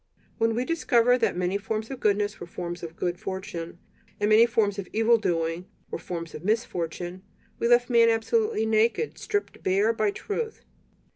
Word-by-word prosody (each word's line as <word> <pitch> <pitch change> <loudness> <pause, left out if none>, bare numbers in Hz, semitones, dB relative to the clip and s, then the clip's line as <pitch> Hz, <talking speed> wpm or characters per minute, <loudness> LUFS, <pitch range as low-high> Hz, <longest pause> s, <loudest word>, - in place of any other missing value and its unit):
When 225 0 +2
we 245 +2 0
discovered 250 -6 +3
that - - +1
many 180 +2 0
forms 220 +2 -3
of 265 - -6
goodness 205 0 +1
were 175 - -7
forms 175 0 -6
of 165 -1 -7
good 175 0 -2
fortune, 190 -3 -5 0.4
and 205 +1 +1
many 225 +2 +7
forms 210 -3 +1
of 190 - -5
evil 225 +2 +4
doing 170 -2 -1 0.2
were - - -3
forms 170 -2 -6
of 155 - -8
misfortune, 180 -4 -2 0.4
we - - +1
left 240 0 +5
man 235 -2 +5
absolutely 230 - +1
naked, 225 - +1
stripped 410 0 -3
bare 200 +4 +2
by 215 -2 +1
truth. 440 - -4
215 Hz, 170 wpm, -26 LUFS, 180-235 Hz, 0.4 s, many